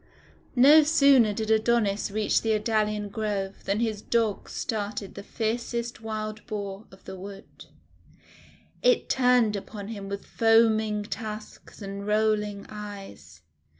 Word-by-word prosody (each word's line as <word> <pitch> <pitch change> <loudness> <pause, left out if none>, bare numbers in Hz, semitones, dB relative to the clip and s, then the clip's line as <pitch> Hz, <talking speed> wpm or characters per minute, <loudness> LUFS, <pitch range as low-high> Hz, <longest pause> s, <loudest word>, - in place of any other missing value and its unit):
No 285 +5 +8
sooner 280 -7 +5
did 220 +1 -2
Adonis 220 -2 +2
reach 210 +1 +1
the 225 -1 +1
Idalian 215 -1 0
Grove 205 -2 -3
than 200 +2 0
his 220 -3 -1
Dogs 225 -3 -1
started 205 -2 -4
the 200 - -8
fiercest 235 +2 -3
Wild 215 -1 -5
Boar 200 0 -5
of 190 - -18
the 190 - -8
wood. 195 +1 -11 1.2
It - - +3
turned 250 -4 +3
upon 200 +1 -7
him 200 -3 -7
with 200 0 -5
foaming 220 -2 +3
tusks 215 0 -8
and 200 +1 -6
rolling 210 -1 0
eyes. 195 - -10
215 Hz, 125 wpm, -26 LUFS, 200-225 Hz, 1.2 s, No